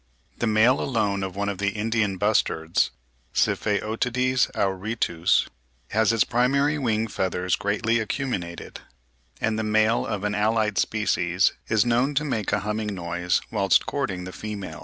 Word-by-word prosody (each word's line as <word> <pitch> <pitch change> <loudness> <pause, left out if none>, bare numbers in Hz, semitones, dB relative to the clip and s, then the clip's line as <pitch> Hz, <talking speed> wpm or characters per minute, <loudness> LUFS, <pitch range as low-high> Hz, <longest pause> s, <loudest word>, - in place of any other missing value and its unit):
The 120 - 0
male 110 +4 +4
alone 105 -6 0
of 95 -1 -4
one 100 0 -2
of 100 -2 -3
the 100 0 0
Indian 105 -2 0
bustards 85 -5 +1 0.5
(Sypheotides 120 +5 +1
auritus) 95 -3 +1 0.4
has 110 +1 +2
its 115 -1 +3
primary 140 +5 +1
wing 110 -4 0
feathers 90 -3 -1
greatly 110 +3 0
acuminated; 110 -7 -4 0.6
and 110 0 0
the - - -1
male 110 +1 +2
of 105 -2 -3
an 105 0 -1
allied 105 0 +1
species 90 -4 +1
is 110 0 +2
known 125 +4 +1
to 150 +2 +1
make 110 -8 -2
a - - +1
humming 105 0 -3
noise 85 0 -1
whilst 100 -3 +3
courting 95 -11 -3
the 90 0 -8
female. 100 -8 -6
105 Hz, 145 wpm, -25 LUFS, 95-115 Hz, 0.6 s, male